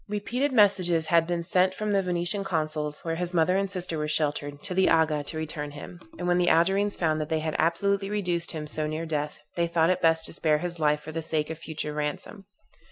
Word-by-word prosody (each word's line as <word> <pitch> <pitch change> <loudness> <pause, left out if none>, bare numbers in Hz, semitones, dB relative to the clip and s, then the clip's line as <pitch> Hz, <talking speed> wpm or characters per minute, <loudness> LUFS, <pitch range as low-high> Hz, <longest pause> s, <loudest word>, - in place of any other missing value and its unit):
Repeated 240 +7 -1
messages 185 -8 +3
had 165 0 +3
been 175 -1 -1
sent 185 +1 +2
from 210 +2 -2
the 200 -1 +3
Venetian 180 +2 0
consul's, 155 -4 -2
where 165 - -1
his 180 +1 -3
mother 170 +2 +3
and 195 0 0
sister 180 -4 -2
were 150 - -1
sheltered, 145 -1 -1
to - - -3
the 190 +1 +3
Aga, 155 -3 +2
to 160 - -5
return 155 -1 -4
him; 150 +4 -9 0.2
and 175 - -3
when 175 0 +3
the 175 - +3
Algerines 195 +5 +3
found 155 -2 0
that 155 - -4
they 160 - +1
had 155 0 -3
absolutely 195 +4 +1
reduced 180 -5 -1
him 155 -2 -5
so 155 0 -2
near 155 +2 -3
death, 150 -2 -3 0.2
they 170 -1 +1
thought 165 0 +2
it 185 - -1
best 160 0 +3
to - - -5
spare 155 -2 +2
his 170 +1 -4
life 150 -1 +2
for 155 - -8
the 165 +1 -3
sake 155 -1 -2
of 160 - -7
future 155 -2 -5
ransom. 150 +7 -4
165 Hz, 230 wpm, -27 LUFS, 155-185 Hz, 0.2 s, messages